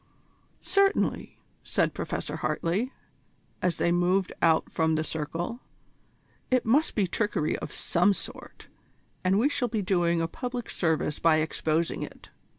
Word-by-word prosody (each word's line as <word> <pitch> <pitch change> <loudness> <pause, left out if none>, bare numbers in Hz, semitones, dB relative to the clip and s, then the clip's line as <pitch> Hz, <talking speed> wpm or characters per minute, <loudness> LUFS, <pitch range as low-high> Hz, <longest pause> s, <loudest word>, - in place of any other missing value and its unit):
"Certainly," 395 0 +1 0.3
said - - +1
Professor - - -3
Hartley, 200 +10 -1 0.7
as 175 -2 +1
they 170 - +2
moved 180 +2 +2
out 160 -1 +3
from 160 -1 +1
the 155 - 0
circle; 165 +9 -3 0.9
"it 255 -1 +2
must 275 +8 +3
be 205 - +3
trickery 185 -4 0
of - - -6
some 180 +4 +2
sort, 195 - -6 0.6
and 185 +1 +3
we 235 +7 +4
shall 275 -4 0
be 215 -3 -2
doing 175 -2 +2
a 165 - 0
public 245 +5 -5
service 160 -3 0
by 165 -1 +4
exposing 160 +1 0
it. - - -9
175 Hz, 140 wpm, -27 LUFS, 165-225 Hz, 0.9 s, we